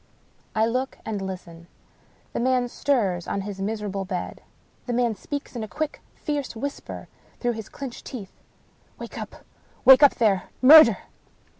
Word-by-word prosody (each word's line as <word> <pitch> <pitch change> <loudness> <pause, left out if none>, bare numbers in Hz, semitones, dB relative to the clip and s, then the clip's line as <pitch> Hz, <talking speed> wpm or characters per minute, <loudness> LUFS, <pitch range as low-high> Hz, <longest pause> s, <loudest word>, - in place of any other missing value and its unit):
I 220 0 +3
look 255 +3 -2
and 210 -3 -3
listen. 175 -3 -8 0.7
The - - -2
man 250 0 +2
stirs 205 -12 0
on 200 - -2
his 195 -1 -6
miserable 205 -1 -3
bed. 185 -2 -5 0.5
The 245 - -1
man 240 -1 +1
speaks 280 +7 -6
in 235 - -3
a - - -5
quick, 310 +5 -4
fierce 290 -5 -3
whisper 280 +5 -6 0.3
through 245 - 0
his 220 -2 -8
clinched 270 -4 -8
teeth. 215 -8 -8 0.3
" - - -36
Wake - - -8
up! - - -9 0.4
Wake 265 +1 +9
up, 285 - +7
there! 205 -6 +1
Murder 255 -6 +9
225 Hz, 155 wpm, -25 LUFS, 195-260 Hz, 0.7 s, Wake